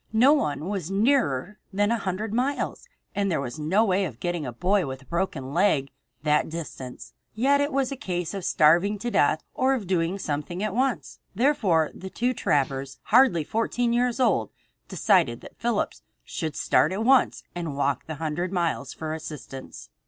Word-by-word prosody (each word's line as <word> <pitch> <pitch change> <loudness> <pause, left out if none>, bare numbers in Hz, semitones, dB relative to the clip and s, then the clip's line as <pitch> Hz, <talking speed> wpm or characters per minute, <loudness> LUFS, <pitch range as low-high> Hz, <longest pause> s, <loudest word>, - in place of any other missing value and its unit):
No 250 +6 +6
one 150 - -1
was 190 -4 -3
nearer 210 - +1
than 205 +2 +1
a 235 - +2
hundred 200 +2 -3
miles, 260 +5 -1 0.3
and 200 -1 0
there 165 - 0
was 125 0 -5
no 185 +9 +2
way 195 -1 +2
of 130 -9 -7
getting 175 -5 -2
a - - -3
boy 180 - +1
with 130 0 -6
a - - -22
broken 155 -6 -3
leg 165 -7 +2 0.3
that 150 0 +2
distance. 150 -6 -7 0.2
Yet 275 +5 +3
it 285 +1 0
was 270 -1 0
a - - -2
case 175 -7 -3
of 195 -2 -4
starving 175 +9 +4
to 240 +4 -4
death 155 -3 +2
or 265 +1 +2
of 230 -6 -4
doing 175 0 0
something 175 +2 -3
at 215 -2 -1
once. 255 +2 -1 0.2
Therefore 210 - +2
the 190 - -8
two 245 +6 0
trappers, 135 - -1
hardly 240 - +4
fourteen 235 +5 0
years 245 +1 +1
old, 255 - +2 0.4
decided - - +2
that - - -13
Phillips 235 -3 -1 0.2
should 155 -3 -4
start 155 - +3
at 205 +4 -2
once 265 0 +4
and 165 -5 -4
walk 140 -2 0
the 155 - -4
hundred 160 +4 -2
miles 170 -7 -1
for 155 0 -4
assistance. 135 - -8
185 Hz, 180 wpm, -26 LUFS, 150-225 Hz, 0.4 s, No